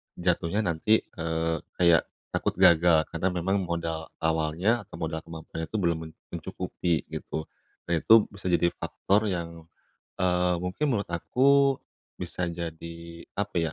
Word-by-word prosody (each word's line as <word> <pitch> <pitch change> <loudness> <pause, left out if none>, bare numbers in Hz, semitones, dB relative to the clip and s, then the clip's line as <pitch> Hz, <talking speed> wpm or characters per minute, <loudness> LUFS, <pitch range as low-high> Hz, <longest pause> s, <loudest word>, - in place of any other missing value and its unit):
jatuhnya 90 +3 0
nanti, 100 +5 +2
eee, 80 -1 -2 0.2
kayak 85 -2 +4 0.2
takut - - -1
gagal. 85 -1 +6
Karena 85 +3 0
memang 95 +2 0
modal 85 -1 -3 0.2
awalnya, 80 +7 +1
atau - - -11
modal 80 -1 -3
kemampuannya 80 0 -7
itu - - -8
belum 85 -1 +2
men - - -12 0.2
mencukupi, 85 -4 -2
gitu. 80 - -4 0.5
Nah - - +3
itu 110 +5 +7
bisa 100 -2 -7
jadi 85 0 +3
faktor 105 +2 0
yang, 85 -3 -5 0.5
eee, 90 -1 +2
mungkin 90 +11 -2
menurut 100 -3 -1
aku 135 +10 +3 0.4
bisa 90 0 -3
jadi, 85 0 -7
apa 105 -2 -2
ya, 80 -2 +1
85 Hz, 140 wpm, -27 LUFS, 80-95 Hz, 0.5 s, itu